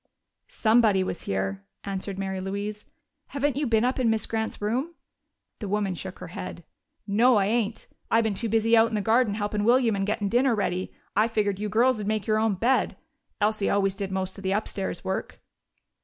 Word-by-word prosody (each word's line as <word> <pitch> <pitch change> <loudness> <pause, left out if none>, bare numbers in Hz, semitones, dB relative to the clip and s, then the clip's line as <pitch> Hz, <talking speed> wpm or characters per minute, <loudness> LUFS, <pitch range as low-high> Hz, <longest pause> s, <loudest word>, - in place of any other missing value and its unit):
"Somebody 220 -4 +3
was 175 - -5
here," 95 0 -2 0.2
answered 195 0 -4
Mary 190 -1 -3
Louise. 200 +2 -4 0.4
"Haven't 280 -1 -1
you 285 0 0
been 225 0 +3
up 255 +1 0
in 245 -3 +3
Miss 220 -1 +1
Grant's 220 0 -3
room?" 255 +11 -2 0.6
The 210 - -5
woman 200 -1 0
shook 185 +1 -7
her - - -9
head. - - -7 0.4
"No, 230 +5 +4
I 200 -2 +3
ain't. 225 +1 -1 0.2
I've 225 0 +4
been 220 -2 0
too 225 +4 -2
busy 225 +1 +3
out 225 0 +5
in 225 - -3
the 210 - 0
garden 220 0 +2
helpin' 205 0 -1
William 235 -1 +4
and 195 0 -1
gettin' 205 -1 0
dinner 245 +3 +3
ready. 185 -3 -2 0.2
I 215 +3 +4
figured 205 -4 0
you 210 0 -2
girls'd 225 -1 +2
make 215 -2 -1
your 215 0 +2
own 220 -2 +2
bed. 245 +7 +1 0.4
Elsie 215 -1 +1
always 195 -1 +2
did 195 -1 -4
most 190 +1 -3
of - - -11
the 190 0 0
upstairs 195 -3 -3
work." 190 - -4
210 Hz, 195 wpm, -26 LUFS, 195-230 Hz, 0.6 s, out